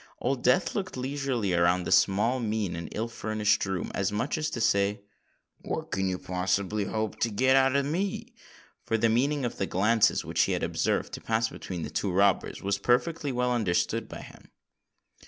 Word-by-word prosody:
Old 130 Hz, 0 st, -1 dB
Death 125 Hz, +9 st, +2 dB
looked 190 Hz, -8 st, -4 dB
leisurely 130 Hz, -6 st, -1 dB
round 90 Hz, +1 st, +2 dB
the -, -, -3 dB
small, 105 Hz, +6 st, +3 dB
mean, 105 Hz, -6 st, -2 dB
and 85 Hz, 0 st, -6 dB
ill 115 Hz, +2 st, -2 dB
furnished 110 Hz, -2 st, 0 dB
room, 95 Hz, -2 st, -3 dB
as 95 Hz, 0 st, 0 dB
much 115 Hz, +7 st, -1 dB
as 155 Hz, 0 st, -1 dB
to -, -, -5 dB
say, 100 Hz, -2 st, +1 dB, 0.6 s
"What -, -, -5 dB
can 95 Hz, -1 st, 0 dB
you 90 Hz, -, -2 dB
hope 100 Hz, +4 st, -2 dB
to 115 Hz, -, +1 dB
get 130 Hz, +5 st, +3 dB
out 135 Hz, 0 st, +4 dB
of 140 Hz, -1 st, +2 dB
me?"—for 165 Hz, -, -4 dB
the 115 Hz, +1 st, +2 dB
meaning 135 Hz, +4 st, +1 dB
of 120 Hz, -, -4 dB
the 95 Hz, -, 0 dB
glances 105 Hz, +4 st, +2 dB
which -, -, 0 dB
he -, -, -1 dB
had -, -, -2 dB
observed -, -, -1 dB
to -, -, -6 dB
pass 110 Hz, 0 st, 0 dB
between 90 Hz, -3 st, -6 dB
the 75 Hz, -, -6 dB
two 95 Hz, +4 st, -1 dB
robbers, 100 Hz, +1 st, +1 dB
was 100 Hz, 0 st, 0 dB
perfectly 140 Hz, +7 st, +1 dB
well 125 Hz, 0 st, 0 dB
understood 105 Hz, -8 st, 0 dB
by -, -, -8 dB
him. -, -, -14 dB
110 Hz, 185 wpm, -28 LUFS, 100-130 Hz, 0.6 s, out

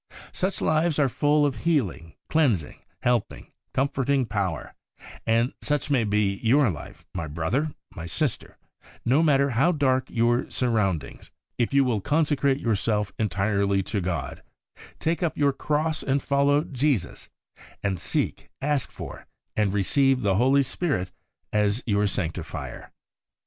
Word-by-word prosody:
Such 190 Hz, +2 st, -2 dB
lives 155 Hz, 0 st, +2 dB
are 145 Hz, -2 st, +4 dB
full 145 Hz, +3 st, +2 dB
of 140 Hz, -3 st, -1 dB
healing, 110 Hz, -, -1 dB
cleansing, 120 Hz, -, +1 dB, 0.2 s
helping, 120 Hz, -1 st, -1 dB, 0.2 s
comforting 135 Hz, 0 st, +1 dB
power; 100 Hz, -8 st, -3 dB, 0.5 s
and 115 Hz, +3 st, +2 dB
such 145 Hz, -1 st, -1 dB
may 125 Hz, -5 st, +3 dB
be 100 Hz, -1 st, +1 dB
your 125 Hz, 0 st, +4 dB
life, 75 Hz, -, -10 dB
my 85 Hz, -3 st, -3 dB
brother, 85 Hz, -, -1 dB, 0.2 s
my 85 Hz, -3 st, -7 dB
sister, 140 Hz, -, -2 dB, 0.5 s
no 130 Hz, +6 st, +4 dB
matter 140 Hz, -3 st, +3 dB
how 135 Hz, +9 st, +3 dB
dark 130 Hz, -5 st, +1 dB
your 120 Hz, +1 st, +1 dB
surroundings, 100 Hz, -, -1 dB, 0.3 s
if 120 Hz, -, +1 dB
you 140 Hz, 0 st, +4 dB
will 120 Hz, -6 st, 0 dB
consecrate 145 Hz, 0 st, +2 dB
yourself 105 Hz, -2 st, 0 dB
entirely 100 Hz, -2 st, +1 dB
to 100 Hz, +1 st, -2 dB
God, 85 Hz, -8 st, -3 dB, 0.6 s
take 165 Hz, +2 st, -1 dB
up 170 Hz, -3 st, -1 dB
your 140 Hz, -1 st, +3 dB
cross 155 Hz, +3 st, -1 dB
and 140 Hz, 0 st, +1 dB
follow 140 Hz, +2 st, +2 dB
Jesus, 135 Hz, -, -1 dB, 0.5 s
and 95 Hz, -3 st, -1 dB
seek, -, -, -2 dB
ask 145 Hz, -1 st, 0 dB
for, -, -, -9 dB, 0.3 s
and 105 Hz, -2 st, +2 dB
receive 130 Hz, +6 st, +2 dB
the 100 Hz, -2 st, +3 dB
Holy 135 Hz, +4 st, +4 dB
Spirit 130 Hz, -, -2 dB, 0.4 s
as 105 Hz, +3 st, +1 dB
your 105 Hz, -2 st, +2 dB
Sanctifier. 85 Hz, -4 st, -5 dB
125 Hz, 135 wpm, -25 LUFS, 100-145 Hz, 0.6 s, are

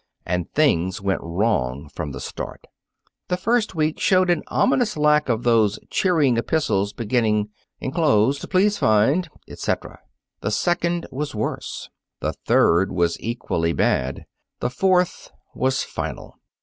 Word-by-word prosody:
And 90 Hz, -1 st, -2 dB
things 95 Hz, -, +2 dB
went 95 Hz, 0 st, -1 dB
wrong 85 Hz, -, -1 dB
from 75 Hz, 0 st, -6 dB
the 65 Hz, -, -7 dB
start. -, -, -7 dB, 0.6 s
The 180 Hz, -, 0 dB
first 225 Hz, 0 st, 0 dB
week 155 Hz, 0 st, 0 dB
showed 185 Hz, -1 st, +3 dB
an 170 Hz, -, +1 dB
ominous 245 Hz, -7 st, +1 dB
lack 150 Hz, -1 st, +3 dB
of 115 Hz, -1 st, 0 dB
those 110 Hz, -3 st, +3 dB
cheering 155 Hz, -10 st, +2 dB
epistles 115 Hz, -7 st, 0 dB
beginning, 110 Hz, -2 st, 0 dB, 0.3 s
"Enclosed 135 Hz, -3 st, +1 dB
please 205 Hz, +2 st, +2 dB
find," 135 Hz, -, +3 dB, 0.2 s
etc. -, -, -4 dB, 0.4 s
The 105 Hz, -, -2 dB
second 175 Hz, -, 0 dB
was 145 Hz, -1 st, -4 dB
worse. 105 Hz, -, -4 dB, 0.3 s
The -, -, -2 dB
third 90 Hz, +4 st, +3 dB
was 85 Hz, -1 st, 0 dB
equally 85 Hz, -8 st, -2 dB
bad. 65 Hz, -3 st, 0 dB, 0.3 s
The 120 Hz, -, -1 dB
fourth 180 Hz, +5 st, +1 dB, 0.2 s
was 130 Hz, +1 st, 0 dB
final. -, -, -6 dB
125 Hz, 130 wpm, -22 LUFS, 100-170 Hz, 0.6 s, showed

